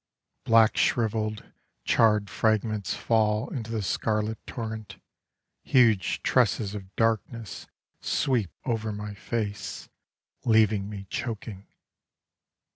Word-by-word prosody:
Black 115 -1 +5
shrivelled, 110 -2 +1 0.4
charred 105 -2 +4
fragments 110 0 0
Fall 110 +1 +1
into 115 -5 -5
the 110 -2 -2
scarlet 110 +2 -1
torrent: 110 -3 -6 0.6
Huge 115 -8 +3
tresses 100 -2 +2
of 95 -2 -9
darkness 115 -1 -1 0.3
sweep 125 - +1 0.2
over 110 -3 -1
my 105 0 -5
face, 105 0 -4 0.5
Leaving 110 -3 +3
me 100 -2 -7
choking. 110 -4 -5
110 Hz, 95 wpm, -27 LUFS, 105-115 Hz, 0.6 s, Black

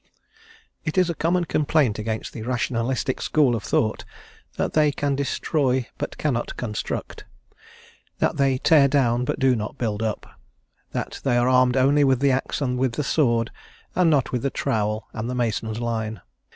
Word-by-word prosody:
IT 155 - -3
is 180 -2 +3
a - - -2
common 170 +2 0
complaint 145 -8 +1
against 110 +1 -4
the 115 - -7
Rationalistic 125 +2 -1
school 140 -6 +2
of 110 - -3
thought 110 +1 0 0.5
that - - -1
they 150 -1 +4
can 140 -1 -1
destroy 135 -2 0
but - - -4
cannot 125 -6 -2
construct; 105 -4 -4 0.9
that - - 0
they 135 -2 +2
tear 145 +1 +5
down, 125 -3 +2
but - - -1
do 130 -1 +4
not 110 +4 -5
build 110 -4 -2
up; 110 -2 -2 0.6
that - - -5
they 120 -3 +2
are 120 +1 +3
armed 130 0 +4
only 140 +3 +4
with 135 -2 +3
the 140 0 +3
axe 130 +3 -1
and 125 -2 -1
with 130 -2 +1
the 150 - -2
sword, 120 -6 +1 0.4
and 180 -2 +3
not 145 -5 +2
with 125 - -1
the 140 - 0
trowel 105 -3 -1
and 115 +2 -4
the 125 - -3
mason's 115 -2 -1
line. 110 -2 -3
125 Hz, 175 wpm, -23 LUFS, 115-140 Hz, 0.9 s, tear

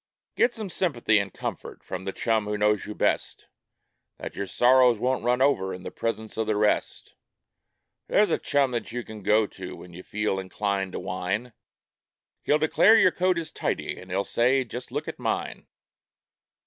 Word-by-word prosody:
Get 240 - +2
some 215 -5 -5
sympathy 120 - +2
and 100 -1 -3
comfort - - -6
from 95 0 -6
the 95 - -2
chum 110 0 0
who 105 0 -2
knows 105 0 +1
you 105 - -6
best, - - -1 0.7
Then - - -6
your 100 - -4
sorrows 125 +3 +5
won't 130 +2 0
run 125 +2 +2
over 95 -9 +1
in 90 - -11
the - - -6
presence 110 -1 -4
of 110 -1 -1
the 110 - +1
rest; 105 0 0 0.9
There's 205 -4 +3
a - - +1
chum 140 -2 +1
that 120 -2 -3
you 120 +1 -4
can 110 -2 -10
go 105 +2 +3
to 95 -2 -9
when 90 - -12
you 90 - -9
feel 105 0 -2
inclined 95 0 -2
to - - -3
whine, 95 +6 -3 0.9
He'll 150 - +3
declare 185 +8 +5
your 185 -4 +5
coat 185 0 +1
is 165 -2 -4
tidy, - - -3
and 95 - -13
he'll 95 +2 0
say: 130 +3 +2
"Just 125 0 -8
look - - -3
at - - -6
mine - - -3
110 Hz, 185 wpm, -26 LUFS, 100-130 Hz, 0.9 s, sorrows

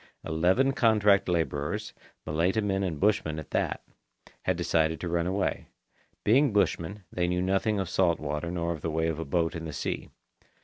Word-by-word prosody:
Eleven 90 +12 +2
contract 105 -7 +3
labourers, 80 -4 -1 0.3
Malaita 85 +7 +1
men 100 -2 0
and 85 -6 -2
bushmen 95 -6 +1
at 80 - -8
that, - - -1 0.6
had - - +1
decided 80 0 +1
to 90 - -4
run 85 0 0
away. 95 +2 -1 0.6
Being 135 +5 +4
bushmen, 100 -1 0
they 90 -1 0
knew 90 0 0
nothing 95 +3 +1
of 95 - -1
salt 85 -2 +2
water 75 +2 -3
nor 85 -1 -2
of 80 -3 -5
the 80 - -2
way 80 +1 0
of 80 -1 -3
a 80 - -3
boat 80 +4 0
in 80 0 -5
the 80 - -6
sea. - - -3
85 Hz, 180 wpm, -28 LUFS, 80-100 Hz, 0.6 s, Being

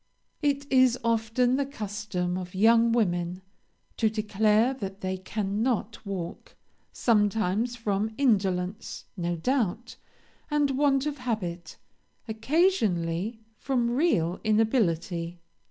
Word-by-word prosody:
"It 285 -1 0
is 255 -2 +5
often 230 +2 +1
the 280 - 0
custom 205 -7 -3
of 180 0 -6
young 230 +3 +5
women 180 -5 0 0.5
to 220 - +3
declare 215 +2 +2
that 195 -6 -7
they 185 0 -2
cannot 210 +4 -2
walk, 180 -3 -6 0.4
sometimes 220 +1 +1
from 215 -2 -1
indolence, 195 -6 0
no 175 -2 -2
doubt, 235 +3 -1 0.5
and 295 -2 +2
want 275 0 +2
of 295 -2 -3
habit, 190 -9 -4 0.5
occasionally 220 - 0 0.2
from 245 -4 0
real 220 - +1
inability. 180 -6 +1
220 Hz, 105 wpm, -27 LUFS, 185-245 Hz, 0.5 s, is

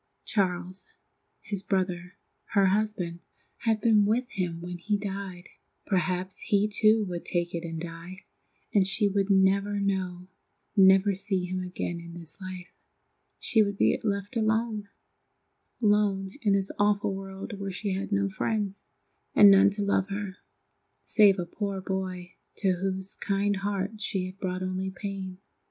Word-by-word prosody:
Charles, 185 -2 -1 0.5
his 200 -2 -3
brother, 180 -2 -2 0.4
her 200 -1 +6
husband, 190 -4 0 0.4
had 225 -2 +1
been 215 -2 +5
with 230 +5 +1
him 180 -4 -2
when 175 +1 -6
he 205 +4 0
died. 195 -3 -6 0.4
Perhaps 185 -1 -1
he 205 0 +2
too 215 0 +3
would 175 -2 -5
take 175 -1 -1
it 170 0 -3
and 165 -1 -5
die, 170 +2 -8 0.5
and 195 -3 +4
she 205 +2 +3
would 200 0 0
never 200 +1 +3
know, 185 -2 -2 0.5
never 195 +1 +6
see 190 -1 -1
him 185 +1 -3
again 180 -1 -4
in 170 0 -10
this 170 +4 -11
life. 185 -1 -8 0.7
She 220 - +3
would 200 -1 0
be - - +3
left 200 +2 -2
alone—alone 210 -2 -2
in 205 -3 +3
this 195 -1 +1
awful 205 -1 +2
world 195 +2 -7
where 195 -1 -3
she 195 +2 -3
had 195 +2 -3
no 200 -1 +2
friends, 205 0 -2 0.5
and 205 -1 +9
none 195 0 +7
to 205 +1 -2
love 200 -1 +1
her, 200 -1 -4 0.7
save 205 -3 +5
a 175 - -2
poor 200 +2 -3
boy 185 -1 -4 0.2
to 195 -2 +2
whose 190 +1 -2
kind 200 0 0
heart 200 +1 -3
she 190 -3 -1
had 185 +1 -9
brought 185 -1 -2
only 185 +1 -2
pain. 190 -1 -6
195 Hz, 150 wpm, -28 LUFS, 185-205 Hz, 0.7 s, and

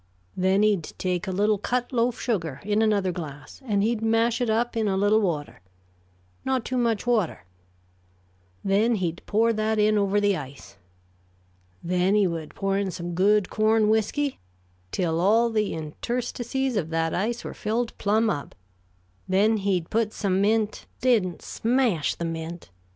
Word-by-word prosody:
Then 190 +2 +2
he'd 205 -7 +1
take 180 -1 -2
a - - -1
little 205 +2 +1
cut 245 +4 -2
loaf 235 0 +1
sugar, 165 - -2
in 210 +2 +1
another 205 -4 +2
glass, 155 - -8
and 205 -5 +1
he'd 225 0 0
mash 225 +2 +2
it 245 - +1
up 230 +2 0
in 220 -2 +1
a 190 -1 +1
little 205 +2 +3
water 155 - -3 0.8
not 260 -3 -1
too 255 - -2
much 230 -3 0
water 215 - 0 1.2
then 210 +4 +2
he'd 175 -4 -2
pour 225 +2 +3
that 215 0 0
in 210 0 +3
over 200 0 +2
the 205 -1 +2
ice. 135 - -9 1.1
Then 180 +3 +1
he 210 -2 +4
would 165 -3 -4
pour 195 0 0
in 200 -1 -1
some 175 -1 -5
good 200 +2 +3
corn 215 0 +3
whisky, 220 +6 0 0.5
till 165 -3 0
all 225 +5 +4
the 215 -2 0
interstices 240 - -3
of 165 -5 -1
that 165 0 0
ice 230 +5 -1
were - - -6
filled 230 +3 -2
plumb 220 +3 +2
up; 145 -9 -3 0.7
then 210 +4 +3
he'd 190 -4 -1
put 220 -1 0
some 195 -2 0
mint 215 +1 0
" - - -39
"Didn't 220 -9 +1
smash 230 - 0
the 170 - -4
mint? 165 - -6
210 Hz, 160 wpm, -25 LUFS, 180-225 Hz, 1.2 s, he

